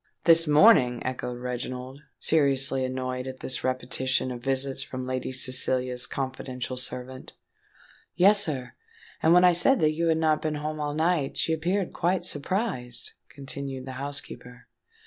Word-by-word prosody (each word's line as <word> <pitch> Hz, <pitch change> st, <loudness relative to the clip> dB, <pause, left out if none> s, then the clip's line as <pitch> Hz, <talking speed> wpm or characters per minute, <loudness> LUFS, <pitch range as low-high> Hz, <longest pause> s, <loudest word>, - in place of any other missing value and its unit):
"This 165 Hz, 0 st, +6 dB
morning!" 150 Hz, -, +5 dB
echoed 125 Hz, -1 st, -4 dB
Reginald, 125 Hz, +2 st, -6 dB, 0.2 s
seriously 135 Hz, -3 st, +2 dB
annoyed 130 Hz, 0 st, -3 dB
at 130 Hz, 0 st, -8 dB
this 130 Hz, -, -2 dB
repetition 130 Hz, 0 st, -1 dB
of 120 Hz, -1 st, -7 dB
visits 135 Hz, 0 st, 0 dB
from 130 Hz, -1 st, -5 dB
Lady 130 Hz, 0 st, -3 dB
Cecilia's 130 Hz, -1 st, +1 dB
confidential 130 Hz, -2 st, -5 dB
servant. 125 Hz, +1 st, -6 dB, 0.8 s
"Yes, 205 Hz, +3 st, +5 dB
sir; 130 Hz, -5 st, -4 dB, 0.5 s
and 160 Hz, -, +3 dB
when 180 Hz, +1 st, +6 dB
I 180 Hz, -1 st, +6 dB
said 260 Hz, +10 st, +4 dB
that 155 Hz, 0 st, +3 dB
you 165 Hz, +2 st, -1 dB
had 160 Hz, -1 st, +2 dB
not 155 Hz, -1 st, +1 dB
been 155 Hz, -1 st, -2 dB
home 155 Hz, +1 st, -4 dB
all 145 Hz, 0 st, -3 dB
night, 160 Hz, -3 st, 0 dB
she 160 Hz, -, +1 dB
appeared 180 Hz, +4 st, -1 dB
quite 180 Hz, +2 st, 0 dB
surprised," 145 Hz, -, -3 dB, 0.2 s
continued 135 Hz, -1 st, -7 dB
the 130 Hz, -, -7 dB
housekeeper. 125 Hz, -4 st, -7 dB
135 Hz, 145 wpm, -26 LUFS, 130-160 Hz, 0.8 s, This